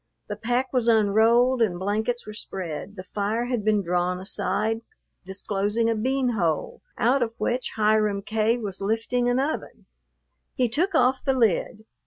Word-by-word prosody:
The 210 - -3
pack 245 +5 -1
was 245 -2 +1
unrolled 230 +3 +4
and 190 -6 +2
blankets 215 +6 -2
were 215 - -8
spread, 185 -2 -6
the 185 - -7
fire 210 +5 -2
had 245 -3 -2
been 210 -1 +2
drawn 180 +1 0
aside, 220 +3 -1 0.5
disclosing 205 +4 -1
a - - 0
bean 260 +3 0
hole, 170 -10 -1 0.2
out 250 +3 +2
of 230 -1 -1
which 245 +1 -2
Hiram 215 -2 +2
K. 220 +3 +1
was 200 -5 -6
lifting 225 +4 0
an 245 +1 +2
oven. 285 +4 -3 0.7
He 250 -2 +1
took 340 - 0
off 260 -3 +3
the 270 - +2
lid. 220 -2 0
220 Hz, 160 wpm, -25 LUFS, 200-245 Hz, 0.7 s, unrolled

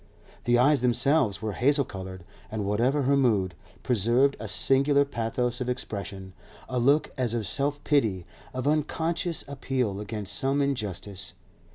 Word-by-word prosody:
The 120 0 +4
eyes 140 +2 +4
themselves 125 -3 +2
were 110 - -1
hazel 140 +6 +2
coloured, 95 -2 -8 0.3
and, 105 -2 -3
whatever 120 +8 +1
her 140 +2 +3
mood, 105 -9 +2 0.3
preserved 125 +4 +3
a 110 - -5
singular 135 +8 +3
pathos 120 0 -2
of 125 - -2
expression, 100 -6 -5 0.3
a 125 -1 -2
look 140 +5 +3
as 120 -2 0
of 115 -3 -2
self 145 +7 0
pity, 110 - +1 0.3
of 130 +2 -3
unconscious 160 +3 -1
appeal 130 -7 -2
against 105 -1 -4
some 135 +1 0
injustice. 100 -8 -3
125 Hz, 145 wpm, -27 LUFS, 105-140 Hz, 0.3 s, The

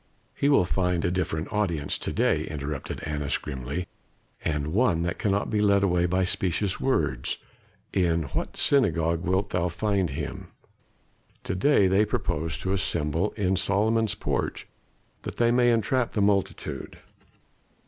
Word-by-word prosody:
"He 140 - +1
will 140 -10 +5
find 90 -1 0
a 85 - +1
different 90 +1 -2
audience 85 -9 0
to - - -3
day," - - +1
interrupted 75 -1 -5
Annas 75 -2 -1
grimly, 70 +5 -5 0.6
"and 75 0 -1
one 95 -7 +2
that 85 - -2
cannot 100 -1 0
be 105 -1 +1
led 100 -1 +4
away 90 -2 +2
by 90 +2 +1
specious 95 +1 0
words. 75 - 0 0.6
In 85 -3 +2
what - - -3
synagogue 85 - +2
wilt 95 +2 0
thou 90 -1 0
find 95 +1 0
him?" - - -5 1.0
"To - - -3
day 100 +3 +4
they 95 +3 +4
purpose 85 -6 -2
to 95 - -1
assemble 85 -1 0
in 95 -3 0
Solomon's 105 +3 +2
Porch, - - -2 0.5
that - - -6
they 120 0 +3
may 120 0 +4
entrap 120 +2 +1
the 105 - 0
multitude. 100 -1 -1
90 Hz, 145 wpm, -26 LUFS, 80-105 Hz, 1.0 s, will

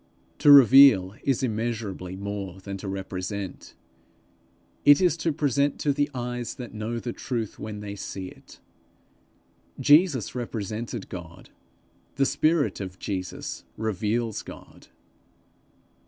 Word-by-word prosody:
To 145 - +6
reveal 135 -8 +8
is 135 -1 0
immeasurably 110 -6 -3
more 100 -1 -5
than 100 +1 -7
to 100 - -8
represent; 95 0 -5 1.1
it 145 0 +7
is 180 -4 +3
to 165 0 0
present 145 -1 +1
to 145 - +2
the 145 +1 0
eyes 125 -2 -4
that 125 -5 -8
know 110 +2 -4
the 120 0 -4
true 120 -3 -3
when 105 -1 -7
they 100 -1 -6
see 95 -1 -6
it. - - -17 1.2
Jesus 150 - +4
represented 115 -1 -5
God; 85 -2 -10 0.6
the 140 - +2
spirit 145 +3 +1
of 95 -2 -6
Jesus 95 -3 -5
reveals 110 +1 -1
God. - - -13
115 Hz, 120 wpm, -26 LUFS, 100-135 Hz, 1.2 s, reveal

